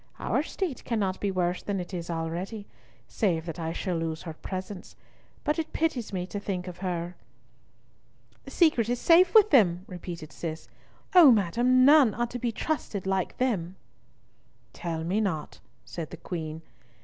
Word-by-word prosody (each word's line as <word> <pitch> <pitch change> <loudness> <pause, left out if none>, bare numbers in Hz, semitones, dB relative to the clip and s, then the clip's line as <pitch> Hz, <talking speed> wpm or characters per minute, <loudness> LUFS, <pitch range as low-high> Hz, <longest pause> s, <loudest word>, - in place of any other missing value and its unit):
Our - - 0
state 355 -9 -4
cannot 200 -6 -1
be 205 - -1
worse 180 -1 -1
than 200 -2 -2
it 180 +2 -7
is 170 -1 -5
already, 170 +6 -4 0.4
save 170 -7 0
that 170 0 -6
I 165 -1 -2
shall 180 +1 -2
lose 165 -1 -3
her 165 - -6
presence, 185 +3 -7 0.5
but 300 +2 0
it 315 - -4
pities 295 -8 -1
me 180 -2 -2
to 205 +2 -5
think 190 -2 -4
of 180 -1 -8
her." 175 -2 -3 1.3
"The - - -8
secret 300 - +3
is 245 0 0
safe 350 +4 +5
with 430 -1 +7
them," 185 - +4
repeated 175 -4 -8
Cis. 160 -2 -6 0.5
"O 350 -6 +9
madam, 240 +5 +3
none 280 -7 +6
are 240 - 0
to 245 +1 -6
be 240 0 -1
trusted 225 - -3
like 190 -1 -1
them." 190 -9 -1 1.0
"Tell 165 -2 -4
me 190 +6 0
not," 160 -8 -3 0.3
said 165 -3 -6
the - - -9
Queen. 160 -2 -6
190 Hz, 165 wpm, -27 LUFS, 170-240 Hz, 1.3 s, O